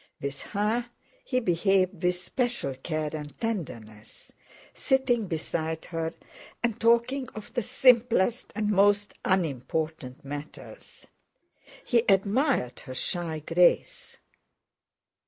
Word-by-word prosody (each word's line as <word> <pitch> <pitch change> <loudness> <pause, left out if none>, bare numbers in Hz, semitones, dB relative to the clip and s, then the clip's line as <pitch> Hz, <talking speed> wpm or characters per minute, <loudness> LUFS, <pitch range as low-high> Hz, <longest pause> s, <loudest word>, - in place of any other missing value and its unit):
With 140 0 -5 0.2
her 225 +4 +1 0.4
he 255 - 0
behaved 185 -2 +1
with 180 0 +2
special 235 - -2
care 155 +3 -3
and 150 -2 -8
tenderness, 115 - -6 0.4
sitting 255 -5 +1
beside 160 -1 -3
her 165 -1 -3 0.5
and 235 -1 -1
talking 235 +3 +3
of 215 -1 -9
the 245 - 0
simplest 240 -1 +3
and 210 0 0
most 205 +1 +3
unimportant 155 -5 -2
matters; 145 +2 -9 0.8
he 235 -2 +3
admired 200 - +2
her 130 - -9
shy 165 +1 -2
grace. 175 +1 +2
185 Hz, 100 wpm, -27 LUFS, 155-230 Hz, 0.8 s, talking